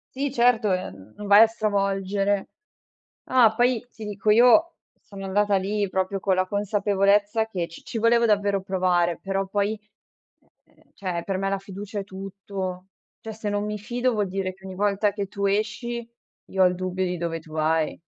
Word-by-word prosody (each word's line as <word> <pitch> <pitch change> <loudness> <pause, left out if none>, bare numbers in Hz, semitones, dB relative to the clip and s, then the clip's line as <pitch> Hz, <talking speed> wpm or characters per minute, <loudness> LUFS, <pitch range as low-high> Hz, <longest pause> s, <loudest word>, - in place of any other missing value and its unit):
Sì 275 0 -1
certo, 235 -5 +3
ehm, 105 - -4
non 210 - -7
vai 205 +1 +7
a 225 - +8
stravolgere 200 -2 -1 0.8
ah, 240 -4 +5
poi 245 0 +1
ti 220 - -11
dico 210 0 -3
io 250 +10 +6 0.3
sono 195 -2 -11
andata 205 +1 +1
lì 200 +2 0
proprio 190 +1 -1
con 190 -1 +1
la 185 0 +1
consapevolezza 205 +2 +1
che 180 -6 -3
ci 165 - -12
ci 235 - -5
volevo 235 +1 +4
davvero 205 -2 +2
provare, 180 -2 +1
però 195 0 -2
poi, 205 +2 -1 0.8
ehm, - - -29
cioè, 180 -3 -3
per 195 -1 -2
me 195 0 -1
la 195 0 -1
fiducia 200 +2 -7
è - - -4
tutto. 190 -1 -6 0.3
Cioè 220 - -7
se 215 -1 -4
non 205 0 -1
mi 210 0 -3
fido 245 +4 -1
vuol 205 -2 0
dire 185 0 -3
che 190 - -17
ogni 190 - -7
volta 205 +1 +1
che 200 -2 -3
tu 200 0 -3
esci 230 +4 -2 0.4
io 190 -1 +2
ho - - +7
il 180 - +3
dubbio 185 +1 -2
di 180 0 -2
dove 165 -1 -3
tu 160 -1 -17
vai. 160 0 0
200 Hz, 185 wpm, -24 LUFS, 190-215 Hz, 0.8 s, a